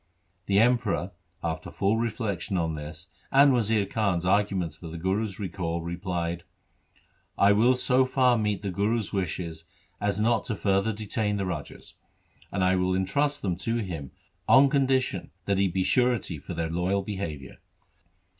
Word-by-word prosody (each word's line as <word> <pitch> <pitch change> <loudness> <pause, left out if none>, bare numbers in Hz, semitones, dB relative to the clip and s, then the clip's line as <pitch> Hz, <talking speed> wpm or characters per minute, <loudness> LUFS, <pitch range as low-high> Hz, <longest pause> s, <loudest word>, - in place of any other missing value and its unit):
The 100 - +2
Emperor, 110 -5 +2 0.3
after 80 0 -3
full 100 +3 +1
reflection 105 -4 -2
on 80 -2 0
this 75 +2 -8 0.3
and 140 0 +6
Wazir 110 -3 +2
Khan's 95 -5 0
arguments 95 -3 +1
for 85 - -10
the 80 +1 -7
Guru's 95 +4 -1
recall, 85 -4 -3
replied, 85 -1 -3 0.5
' - - -37
I - - +6
will 115 +5 +4
so 130 +1 +3
far 130 -1 +3
meet 105 -3 -1
the 100 - -2
Guru's 105 +3 -1
wishes 85 -3 -3 0.3
as 100 0 0
not 115 0 +2
to 110 - -2
further 100 +2 +1
detain 105 0 -2
the 100 - -1
rajas, 85 -5 -6 0.6
and 95 -1 0
I 95 0 +3
will 90 0 +1
entrust 140 +11 0
them 90 -4 0
to 115 0 -2
him 85 - -4 0.4
on 135 +1 +6
condition 135 -2 +1 0.2
that 100 -1 +1
he 100 - +3
be 95 +1 0
surety 120 - +1
for - - -7
their 80 -1 -2
loyal 90 +4 0
behaviour.' 95 -8 -6
100 Hz, 160 wpm, -27 LUFS, 90-115 Hz, 0.6 s, and